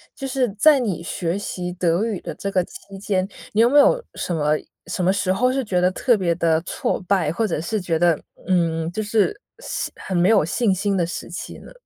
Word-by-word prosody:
就 270 - -5
是 255 -2 0
在 280 +8 +5
你 210 -10 -2
学 170 +1 -2
习 180 -3 -4
德 175 +1 +1
语 220 -5 -2
的 - - -6
这 200 - -4
个 185 -2 +2
期 195 +2 -12
间， 190 -1 -1 0.3
你 215 - +4
有 235 - +5
没 290 +3 +6
有 - - +4
什 175 - -2
么 150 -1 +1 0.3
什 180 +1 -2
么 180 - +4
时 195 -1 0
候 250 +6 +2
是 265 +1 -1
觉 190 -6 0
得 180 +1 +3
特 240 +5 +2
别 175 -4 +1
地 165 -1 +2
挫 175 - -2
败， 180 -4 +1
或 220 +7 0
者 - - -2
是 210 +6 -2
觉 175 -3 -1
得， 170 -2 +3 0.3
嗯， 165 -3 +1
就 215 - -3
是 225 - +1 0.2
是 - - -4
很 190 - -5
没 175 +3 +4
有 215 -6 +5
信 200 +4 +1
心 195 +2 0
的 175 - +2
时 175 - -6
期 175 - -7
呢？ - - -14
190 Hz, 250 characters per minute, -22 LUFS, 175-220 Hz, 0.3 s, 没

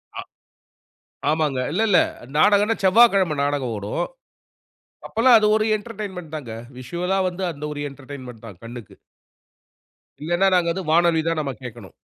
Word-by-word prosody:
ஆ - - -4 1.1
ஆமாங்க. 150 -4 0
இல்ல 210 +7 0
இல்ல. 180 -5 +5 0.4
நாடகன்னா, 205 +5 +4
செவ்வாக்கெழம 190 -6 +5
நாடகம் 140 -5 -2
ஓடும். 100 - -3 1.0
அப்பல்லாம் 230 +1 +5
அது 215 - +2
ஒரு 215 - +1
என்டர்டெயின்மெண்ட்தாங்க. 180 - -7 0.3
விசுவலா 175 +9 -2
வந்து 180 +1 -6
அந்த 150 0 -9
ஒரு 145 - -6
என்டர்டெயின்மெண்ட் 130 -4 -11
தான் 100 -6 -12
கண்ணுக்கு. 120 -2 -10 1.3
இல்லன்னா, 175 +4 +2
நாங்க 170 -1 +2
அது 190 - -4
வானொலி 170 -1 +3
தான் 165 -1 0
நம்ம 140 -2 -3
கேக்கணும். 120 -5 -10
165 Hz, 130 wpm, -22 LUFS, 135-195 Hz, 1.3 s, இல்ல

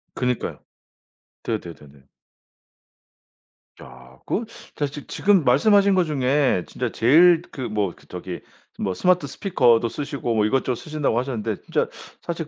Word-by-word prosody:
그니까요. 125 -1 -2 0.8
네네네네. 75 -10 -7 1.8
야 65 +1 -15
그거 230 - -1 0.3
제가 145 -1 -1
지 145 0 -9
지금 195 -5 +2
말씀하신 200 - +4
거 180 - +4
중에 135 - +1
진짜 125 -2 -4
제일 165 +8 +5
그 135 - -6
뭐 105 -4 -1
그 - - -22
저기 90 0 -7 0.4
뭐 95 - -1
스마트 180 - +2
스피커도 120 - +2
쓰시고 140 -3 -3
뭐 105 -1 +2
이것저것 130 +2 0
쓰신다고 150 -3 -2
하셨는데 115 -5 -3
진짜 - - 0 0.3
사실 165 -2 -5
130 Hz, 290 characters per minute, -23 LUFS, 105-155 Hz, 1.8 s, 제일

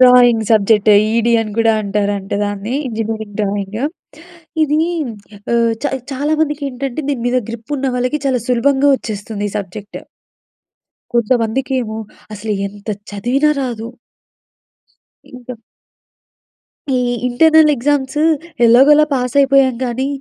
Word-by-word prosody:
Drawing 245 -3 +6
subject, 215 -1 +3 0.3
ఈడి 235 0 +2
అని 215 -2 -4
గూడా 225 0 +4
అంటారంట 200 -1 -2
దాన్ని. 205 +4 -4
Engineering 220 -2 -4
drawing. 200 +1 -3 0.9
ఇదీ 300 +1 +1 0.7
ఆహ్, 230 -1 +2
చా - - +1 0.2
చాలా 290 +4 -1
మందికి 295 -2 -1
ఏంటంటే, 270 +2 -4
దీని 260 -5 -2
మీద 255 +1 +2
గ్రిప్ 235 +5 -6
ఉన్న 270 0 -1
వాళ్ళకి 250 +4 -1
చాలా 255 -3 0
సులభంగా 270 +3 +2
వచ్చేస్తుంది 210 -2 -5
ఈ - - -12
సబ్జెక్ట్. 205 +1 -7 1.2
కొంతమందికేమో 235 0 0 0.4
అసలు 215 +1 -4
ఎంత 205 +2 -12 0.2
చదివినా 250 +9 +1
రాదు. 235 -3 -4 1.5
ఇంక 245 -2 -10 1.4
ఈ - - +2 0.3
ఇంటర్నల్ 315 +4 +5
ఎగ్జామ్సు 285 +3 0 0.4
ఎలాగోలా 280 +6 +6
పాస్ 250 -1 -2
అయిపోయాం 270 -2 +4
కానీ, 250 +2 -2
240 Hz, 115 wpm, -16 LUFS, 215-270 Hz, 1.5 s, Drawing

